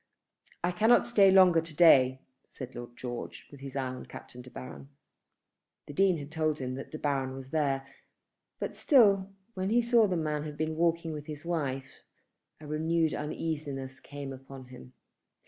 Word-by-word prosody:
"I 175 - +1
cannot 220 +6 +4
stay 205 -5 +5
longer 185 -3 +6
to 165 -1 -10
day," 130 -6 +6 0.3
said 130 -1 -9
Lord 120 0 -9
George, 120 -2 -7
with 140 - -12
his 135 0 -9
eye 135 -2 -1
upon 130 - -9
Captain 125 - -11
De 125 - -13
Baron. 130 +2 -10 1.0
The 145 - -9
Dean 190 +2 +3
had 145 0 -8
told 155 -1 0
him 130 -2 -4
that 135 +1 -7
De 155 - -7
Baron 135 -3 -1
was 135 0 -10
there; 140 -4 0 0.7
but, - - -4
still, 200 - +4 0.2
when 185 -1 -2
he 235 +3 +3
saw 235 -2 +4
that 185 - -1
the - - 0
man 150 -1 -1
had 150 -1 -7
been 155 0 -2
walking 165 0 0
with 150 -1 -7
his 150 0 -8
wife, 135 -6 -3 0.6
a 155 - -12
renewed 160 +2 0
uneasiness 145 -4 -4
came 140 -1 -8
upon 135 0 -11
him. 65 - -13
150 Hz, 180 wpm, -29 LUFS, 135-170 Hz, 1.0 s, longer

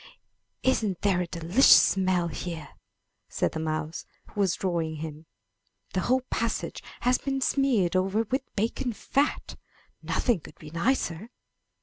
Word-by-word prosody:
''Isn't 215 -8 +1
there 190 -3 +2
a 180 - -2
delicious 170 +9 +3
smell 185 -3 +2
here!" 165 -3 -6 0.6
said - - 0
the 160 - -4
mouse 155 0 -3 0.3
who 210 - -7
was 190 -4 +2
drawing 170 -4 -1
him. 155 0 -7 0.7
"The 185 - +1
whole 260 +5 +2
passage 230 -1 -2 0.2
has 250 +1 +3
been 270 -1 -2
smeared 255 -10 +2
over 195 +4 +2
with 255 +5 -1
bacon 230 +4 -1
fat! 280 +6 -1 0.4
Nothing 240 -7 +1
could - - -14
be 150 - -11
nicer." 180 +1 -1
190 Hz, 135 wpm, -27 LUFS, 165-240 Hz, 0.7 s, delicious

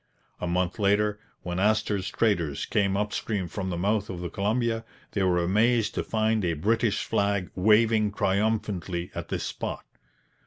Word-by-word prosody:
A 90 - -3
month 90 +3 -1
later, 105 +1 +2 0.2
when 90 0 -3
Astor's 105 -1 +1
traders 85 -11 0
came 100 -1 +1
up 105 +1 -1
stream 100 -5 -2
from 95 +2 -4
the 85 - -2
mouth 105 +3 0
of 90 - -5
the 85 -1 -5
Columbia, 115 +3 0 0.3
they 100 - -1
were 90 -2 +3
amazed 110 +4 +2
to - - -1
find 110 -1 0
a 85 -2 +1
British 110 +6 +1
flag 100 -2 0
'waving 110 +2 +4
triumphantly' 100 -3 -1
at - - -5
this - - -3
spot. - - -4
100 Hz, 160 wpm, -27 LUFS, 90-110 Hz, 0.3 s, waving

